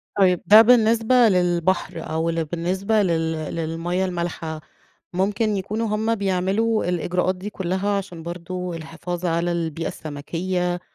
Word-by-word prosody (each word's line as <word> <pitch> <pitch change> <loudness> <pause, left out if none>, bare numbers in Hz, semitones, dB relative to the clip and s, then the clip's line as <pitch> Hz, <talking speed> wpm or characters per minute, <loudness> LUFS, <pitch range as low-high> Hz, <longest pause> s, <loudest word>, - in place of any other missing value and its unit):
طيب 185 -3 +3
ده 215 +2 +9
بالنسبة 230 0 +4
للبحر 180 -1 +1
أو 160 +1 0
ل 165 -1 -1
بالنسبة 185 +7 0
لل 165 -4 +1 0.2
للمَيَّة 165 +3 -1
المالحة، 170 -3 -4 0.5
ممكن 205 +3 0
يكونوا 215 +4 -2
هم 220 +2 0
بيعملوا 200 +3 0
الإجراءات 180 +1 0
دي 195 +3 -6
كلها، 190 0 -2
عشان 175 -4 -7
برضه 175 +1 -5
الحفاظ 175 +2 -5
على 170 +1 0
البيئة 165 -1 -2
السمكية، 175 +4 -3
180 Hz, 125 wpm, -23 LUFS, 170-200 Hz, 0.5 s, ده